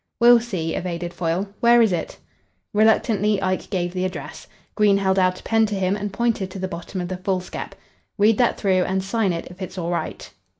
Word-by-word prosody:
"We'll 240 0 +7
see," 185 -9 -3
evaded 175 -1 -4
Foyle. 175 +3 -1
"Where 240 0 +5
is 220 -5 +4
it?" 165 - -4 0.6
Reluctantly, 215 -1 +3
Ike 185 -1 -2
gave 175 -2 -2
the 185 -1 -2
address. 180 -7 -6 0.3
Green 205 -2 +4
held 190 -1 +1
out 185 0 +2
a - - -16
pen 225 -1 +2
to 210 - -3
him 190 0 0
and 205 0 -4
pointed 220 -2 -1
to 190 - -8
the 190 0 -3
bottom 185 +1 -6
of 175 - -4
the 185 0 -4
foolscap. 185 -1 -4 0.4
"Read 210 +1 +3
that 245 - +3
through 190 -3 +2
and 190 0 -1
sign 200 0 0
it 165 -1 -4
if 180 +2 -14
it's 185 0 -6
all 170 -1 -2
right." 175 - -4
190 Hz, 210 wpm, -22 LUFS, 180-210 Hz, 0.6 s, We'll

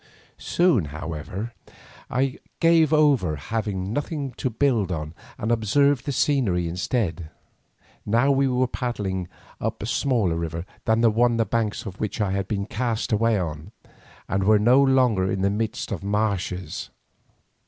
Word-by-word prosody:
Soon, 170 - +2
however, 80 +9 -6 0.6
I 130 +2 0 0.2
gave 165 -2 +4
over, 140 - +3
having 100 +4 -3
nothing 145 0 -3
to 130 - -1
build 115 -6 +1
on, 75 -2 -4 0.2
and 110 - -2
observed 120 +4 +2
the - - +1
scenery 120 - +1
instead. 85 -2 -2 0.7
Now 120 +6 +3
we 135 0 +3
were 130 0 +2
paddling 100 -8 -3 0.3
up 110 -1 -3
a - - -2
smaller 115 - +1
river 85 +1 -4 0.2
than 110 +1 +2
the 115 -2 +5
one 120 +2 +3
on - - -1
the 115 - +2
banks 115 +1 -1
of 95 -2 -8
which 105 - -3
I 105 -3 +1
had 100 0 -1
been 100 -2 -2
cast 115 +1 -2
away, 110 +1 +3 0.9
and 95 0 0
were 105 +2 +5
no 120 +6 +5
longer 125 -8 +3
in 95 -1 -1
the 100 - +3
midst 110 +2 -3
of 100 -2 -4
marshes. 100 -3 -2
110 Hz, 155 wpm, -24 LUFS, 95-125 Hz, 0.9 s, the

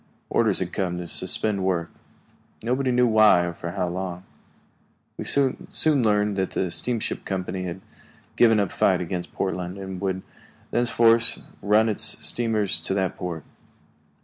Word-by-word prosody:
Orders 110 -4 +2
had 90 -1 -2
come 90 -3 -2
to 90 - -5
suspend 100 +3 -1
work. 85 -3 -1 0.7
Nobody 130 +3 0
knew 125 0 +3
why, 110 -6 +5
or 85 - -4
for 85 - -6
how 90 -2 -1
long. 90 0 -5 0.9
We - - -6
soon 135 -2 +2 0.4
learned 105 -2 +1
that 95 -1 0
the 90 -2 -1
steamship 120 +3 -2
company 95 -1 -3
had 90 +1 -6 0.5
given 115 -3 +5
up 100 -3 +1
the - - -13
fight 95 -2 +3
against 90 0 -4
Portland 90 0 -3
and 95 -1 -7
would 95 -1 -2 0.5
thenceforward 115 -1 +4 0.4
run 105 +2 +3
its 105 - 0 0.2
steamers 110 -4 0
to 95 - -3
that 95 -2 -1
port. 85 -4 -5
95 Hz, 150 wpm, -24 LUFS, 90-110 Hz, 0.9 s, why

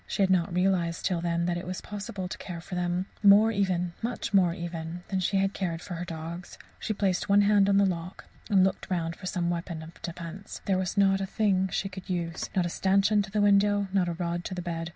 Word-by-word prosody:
She 200 - 0
had 190 - +2
not 175 -3 +2
realized 175 -2 +1
till 175 -3 0
then 170 0 0
that 175 0 0
it 175 - -8
was 185 0 -4
possible 205 -2 -6
to - - -6
care 175 -3 -6
for 175 - -10
them 180 +1 -1 0.2
more 205 +2 +7
even 185 -4 0
much 235 -2 -3
more 185 -3 +5
even 170 0 -5
than 190 - 0
she 190 +2 +1
had 195 +1 +1
cared 170 -4 -2
for 180 - -7
her 175 +1 -4
dogs. 170 +1 -7 0.2
She - - -3
placed 195 -2 0
one 200 +1 +6
hand 200 -1 +4
on 200 - +4
the 200 - +5
lock, 180 -1 -4 0.2
and 195 -3 +5
looked 190 - -1
round 170 -2 -1
for 185 - -8
some 175 -3 -1
weapon 170 -1 -4
of 160 +2 -13
defence. 170 +3 -7
There 190 -2 +1
was 185 +2 -3
not 195 -1 +4
a 195 - -2
thing 190 -3 +1
she 195 - -1
could 190 0 -10
use 170 -2 -3
not 185 -2 +2
a - - 0
stanchion 195 +4 +3
to 195 - -6
the 210 +1 0
window, 205 0 +3
not 185 -3 +2
a - - -1
rod 175 0 -3
to 185 - -4
the 180 - -4
bed. 165 -1 -4
185 Hz, 245 wpm, -28 LUFS, 170-195 Hz, 0.2 s, more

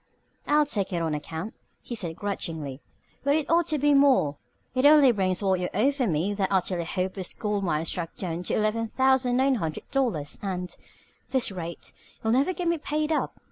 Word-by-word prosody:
"I'll 300 0 +4
take 200 -9 -2
it 175 - 0
on 160 -1 -1
account," 160 +7 -5 0.3
he - - -8
said 175 -8 -4
grudgingly, 160 -9 -4 0.4
"but 280 +1 +3
it 310 -2 0
ought 340 0 +3
to 310 - 0
be 290 +1 +3
more. 265 - +4 0.4
It 255 0 +1
only 290 -3 +7
brings 190 -3 0
what 190 -2 +2
you 180 - -2
owe 260 +8 +3
me 170 +3 0
for 205 - -4
that 195 -2 +1
Utterly 185 -2 0
Hopeless 185 +1 -3
Gold 210 -2 -2
Mine 160 -3 0
stock 165 -1 -3
down 170 -2 -4
to - - -1
eleven 215 +2 0
thousand 260 0 +2
nine 270 +1 +3
hundred 160 -1 -4
dollars 225 - -1
and, 180 -2 -3
at - - -12 0.5
this 260 -5 +2
rate, 170 -3 -7 0.3
you'll 220 0 +2
never 275 +8 +3
get 360 -1 -3
me 335 -1 +1
paid 300 +1 -1
up. 310 - -1
205 Hz, 200 wpm, -26 LUFS, 175-270 Hz, 0.5 s, only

